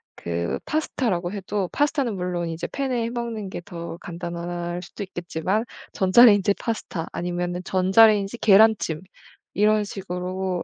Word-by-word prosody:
그 85 Hz, 0 st, -3 dB
파스타라고 220 Hz, -, -1 dB
해도 195 Hz, -1 st, -3 dB
파스타는 285 Hz, -6 st, +1 dB
물론 180 Hz, -2 st, -2 dB
이제 165 Hz, +1 st, -4 dB
팬에 260 Hz, -4 st, -1 dB
해 230 Hz, -, -2 dB
먹는 235 Hz, -4 st, -4 dB
게 180 Hz, -, -6 dB
더 170 Hz, -3 st, -7 dB
간단할 175 Hz, 0 st, -5 dB
수도 200 Hz, -, -7 dB
있겠지만 185 Hz, +3 st, -2 dB, 0.3 s
전자레인지 205 Hz, 0 st, +6 dB
파스타 205 Hz, -7 st, -4 dB
아니면은 175 Hz, 0 st, -3 dB
전자레인지 195 Hz, +3 st, +4 dB
계란찜 205 Hz, -6 st, +4 dB, 0.5 s
이런 210 Hz, +1 st, +3 dB
식으로 185 Hz, -2 st, -4 dB
190 Hz, 320 characters per minute, -24 LUFS, 175-215 Hz, 0.5 s, 전자레인지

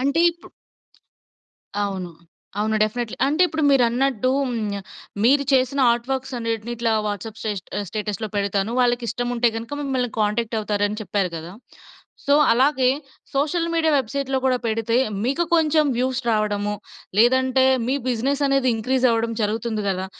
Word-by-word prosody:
అంటే 280 Hz, +5 st, +1 dB
ఇప్పు 340 Hz, 0 st, -16 dB, 1.3 s
అవును. 190 Hz, -3 st, -3 dB, 0.5 s
అవును 215 Hz, +1 st, +1 dB
డెఫినెట్లీ. 220 Hz, +1 st, -2 dB
అంటే 305 Hz, +6 st, +2 dB
ఇప్పుడు 315 Hz, -2 st, -3 dB
మీరు 270 Hz, -3 st, +5 dB
అన్నట్టూ 255 Hz, 0 st, 0 dB, 0.2 s
హ్మ్, 215 Hz, -4 st, -2 dB, 0.5 s
మీరు 280 Hz, +4 st, +5 dB
చేసిన 265 Hz, +1 st, +2 dB
ఆర్ట్ 235 Hz, +1 st, -1 dB
వర్క్స్ 265 Hz, 0 st, -3 dB
అనేటిని 230 Hz, 0 st, -3 dB
ఇట్లా 230 Hz, -1 st, 0 dB
వాట్సాప్ 210 Hz, +2 st, -5 dB
స్టే 220 Hz, -, -2 dB, 0.3 s
ఆహ్, 205 Hz, -, -2 dB
స్టేటస్‌లో 215 Hz, +2 st, -4 dB
పెడతాను 200 Hz, +1 st, 0 dB
వాళ్ళకి 245 Hz, -1 st, +1 dB
ఇష్టం 245 Hz, +1 st, -2 dB
ఉంటే 240 Hz, 0 st, +3 dB
గనక 230 Hz, +5 st, -5 dB
మిమ్మల్ని 255 Hz, -3 st, -1 dB
కాంటాక్ట్ 220 Hz, +2 st, 0 dB
అవుతారు 205 Hz, -1 st, -1 dB
అని 210 Hz, +2 st, -5 dB
చెప్పారు 195 Hz, -3 st, -1 dB
కదా. 165 Hz, +2 st, -8 dB, 0.7 s
సో, 285 Hz, -, +4 dB, 0.2 s
అలాగే 260 Hz, +1 st, +3 dB, 0.5 s
సోషల్ 330 Hz, +4 st, 0 dB
మీడియా 320 Hz, -2 st, +2 dB
వెబ్సైట్‌లో 270 Hz, +1 st, -1 dB
కూడా 255 Hz, -1 st, +3 dB
పెడితే 225 Hz, +1 st, 0 dB, 0.3 s
మీకు 280 Hz, +8 st, +1 dB
కొంచెం 310 Hz, -1 st, +3 dB
వ్యూస్ 260 Hz, +1 st, 0 dB
రావడము, 210 Hz, -1 st, 0 dB, 0.4 s
లేదంటే 260 Hz, +3 st, +4 dB, 0.2 s
మీ 260 Hz, -, +1 dB
బిజినెస్ 265 Hz, +4 st, 0 dB
అనేది 275 Hz, -1 st, +2 dB
ఇంక్రీస్ 255 Hz, +3 st, +1 dB
అవ్వడం 230 Hz, 0 st, 0 dB
జరుగుతుంది 215 Hz, 0 st, -1 dB
గదా! 190 Hz, 0 st, -1 dB
240 Hz, 150 wpm, -22 LUFS, 215-265 Hz, 1.3 s, మీరు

